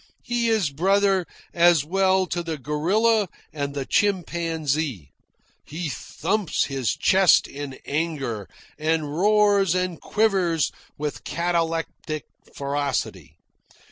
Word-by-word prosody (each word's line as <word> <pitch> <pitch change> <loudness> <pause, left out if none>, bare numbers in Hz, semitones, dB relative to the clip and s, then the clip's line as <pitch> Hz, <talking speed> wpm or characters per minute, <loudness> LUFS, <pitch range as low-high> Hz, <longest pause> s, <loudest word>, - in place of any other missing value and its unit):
He 240 -1 0
is 210 -10 +1
brother 195 +3 +2 0.3
as 170 -4 +4
well 190 +2 +2
to 175 0 -3
the 165 -2 -4
gorilla 190 - +1 0.2
and 140 -2 -3
the 140 -2 -3
chimpanzee. 160 - -1 0.5
He 160 +1 -5
thumps 185 +5 -1
his 135 -4 -1
chest 190 -1 +4
in 140 -2 -7
anger, 140 - -2 0.3
and 155 -1 0
roars 200 -1 +3
and 180 -2 -2
quivers 190 -7 +1 0.3
with 150 0 -4
cataleptic 165 -2 -2 0.3
ferocity. 140 -1 -3
165 Hz, 105 wpm, -24 LUFS, 145-190 Hz, 0.5 s, as